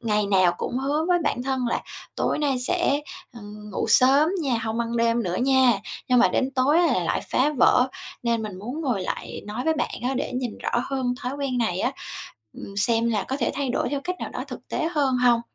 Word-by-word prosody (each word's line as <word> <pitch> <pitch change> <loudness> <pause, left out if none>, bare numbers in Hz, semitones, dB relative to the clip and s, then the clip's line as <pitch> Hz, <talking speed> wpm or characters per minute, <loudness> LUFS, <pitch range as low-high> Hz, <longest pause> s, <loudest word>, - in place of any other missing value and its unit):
ngày 210 -3 +1
nào 185 -3 +4
cũng 250 - -2
hứa 290 +4 0
với 355 -1 +4
bản 245 -4 0
thân 260 -1 -1
là - - -1 0.3
"Tối - - 0
nay 280 -4 +1
sẽ, 290 +2 +1 0.3
ờ, 235 - -11 0.3
ngủ - - -1
sớm 270 +6 +5
nha, 255 -5 +1
hông 220 +1 -2
ăn 235 0 -2
đêm 230 0 +2
nữa 180 -3 -2
nha!" 260 0 +4 0.4
Nhưng 250 -1 +4
mà 240 - +6
đến 265 - 0
tối 270 +5 +3
là 350 - +2
lại - - 0
phá 275 +4 +3
vỡ, 250 +1 +5 0.3
nên 235 -2 0
mình 205 -4 -6
muốn 245 +10 -5
ngồi 245 -11 -1
lại - - -5
nói 215 +4 -4
với 320 0 +2
bạn 310 - -2
á 255 +2 0
để 255 - -2
nhìn 250 -3 -3
rõ - - -3 0.2
hơn 260 -2 -1
thói 250 - -2
quen 270 -3 -1
này 190 -6 0
á, - - 0 0.6
ừm, 200 - -10
xem 230 +2 +2
là 210 -3 0
có 265 - -1
thể 255 - 0
thay 275 -1 -2
đổi 245 - 0
theo 285 -1 -2
cách 365 +1 -2
nào - - -3
đó - - -5
thực - - -9
tế 320 -2 -1
hơn 275 -4 +2
hông? 245 -2 +4
250 Hz, 230 wpm, -24 LUFS, 230-275 Hz, 0.6 s, mà